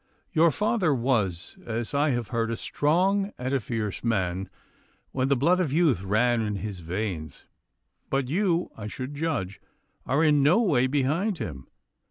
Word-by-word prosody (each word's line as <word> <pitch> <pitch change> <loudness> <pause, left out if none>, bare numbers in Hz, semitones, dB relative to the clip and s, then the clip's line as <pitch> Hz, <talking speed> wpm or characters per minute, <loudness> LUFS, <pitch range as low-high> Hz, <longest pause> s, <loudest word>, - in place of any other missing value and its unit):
Your 165 0 +5
father 195 -3 +1
was, 110 -9 0
as 115 +2 -4
I 145 +2 +2
have 120 -4 -1
heard, 115 -2 -1
a 115 - -2
strong 190 - +1
and 130 +2 -3
a 135 - +2
fierce 110 -3 -4
man 95 -5 -1 0.6
when 130 0 0
the 140 - +3
blood 165 +8 +3
of 170 -7 0
youth 150 - +3
ran 115 +5 +2
in 105 -2 -2
his 100 -1 -5
veins; 85 -2 -4 0.6
but 135 -1 0
you, 175 +2 0
I 105 -1 -6
should 130 +5 -6
judge, 145 - -3 0.5
are 140 +5 +2
in 150 -2 +4
no 155 +10 +5
way 145 - +3
behind 150 +9 0
him. 70 - -6
130 Hz, 165 wpm, -26 LUFS, 110-155 Hz, 0.6 s, Your